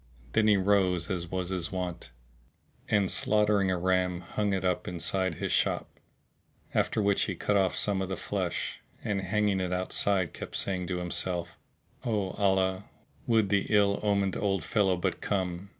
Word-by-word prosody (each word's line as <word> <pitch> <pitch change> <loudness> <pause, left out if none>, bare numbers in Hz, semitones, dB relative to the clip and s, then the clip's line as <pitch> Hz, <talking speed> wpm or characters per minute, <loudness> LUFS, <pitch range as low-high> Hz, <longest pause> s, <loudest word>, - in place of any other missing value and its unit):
Then 110 -1 +3
he 105 -1 +5
rose 95 -3 +2
as 85 -2 -3
was 90 -1 -3
his 90 -2 -2
wont, 90 -2 -4 0.8
and 100 -3 +2
slaughtering 105 -2 +3
a 95 - +1
ram 90 0 +1
hung 105 +4 -2
it 95 -1 -1
up 90 -1 0
inside 90 0 -1
his - - -3
shop; - - 0 0.7
after 110 - +1
which 100 -1 +2
he - - -3
cut 105 - 0
off 95 -2 +2
some 100 -2 0
of 95 - -3
the 95 - -3
flesh, - - -3 0.2
and 100 -2 -1
hanging 100 +1 +1
it 90 -1 -2
outside 95 -1 0
kept - - -7
saying 90 -2 -1
to 90 - -2
himself, 90 0 -1 0.5
"O 105 -5 -1
Allah, 95 -1 +1 0.4
would 110 -4 +3
the 100 -1 +1
ill 100 -1 +3
omened 100 -2 +1
old 100 -1 0
fellow 95 -4 +2
but 85 - -2
come!" 95 -1 -2
95 Hz, 165 wpm, -29 LUFS, 90-100 Hz, 0.8 s, he